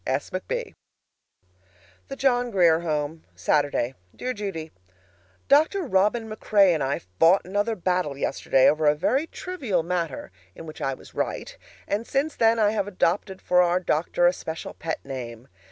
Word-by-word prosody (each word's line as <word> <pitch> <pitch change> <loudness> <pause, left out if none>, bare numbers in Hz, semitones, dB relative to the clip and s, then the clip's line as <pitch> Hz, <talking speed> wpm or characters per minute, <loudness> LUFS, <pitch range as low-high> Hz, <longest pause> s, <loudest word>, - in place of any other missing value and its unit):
S. 135 +2 -1
McB. 475 - -4 1.3
THE 275 - -6
JOHN 245 -3 +1
GRIER 175 -6 +4
HOME, 155 -1 -3
Saturday. 145 -4 +1 0.2
Dear 255 0 -3
Judy: 195 -8 -5 0.8
Dr. 315 +7 +4
Robin 220 - +1
MacRae 205 -3 +3
and 155 - -1
I 135 +1 0 0.2
fought 175 +4 +5
another 205 +4 -1
battle 180 -6 -1
yesterday 135 -1 +2
over 155 0 +3
a 150 - +5
very 265 - 0
trivial 260 - -3
matter 170 - -3 0.2
(in - - -10
which 155 - -10
I 135 -1 -1
was - - -16
right), - - -3 0.3
and 215 +3 -2
since 285 +3 -1
then 225 0 +3
I 210 -2 +3
have 205 -2 -1
adopted 190 0 -1
for 180 0 +4
our 175 0 +2
doctor 175 0 0
a 175 - +5
special 160 -2 -6
pet 160 -1 -5
name. 125 -3 -7
180 Hz, 155 wpm, -25 LUFS, 155-220 Hz, 1.3 s, fought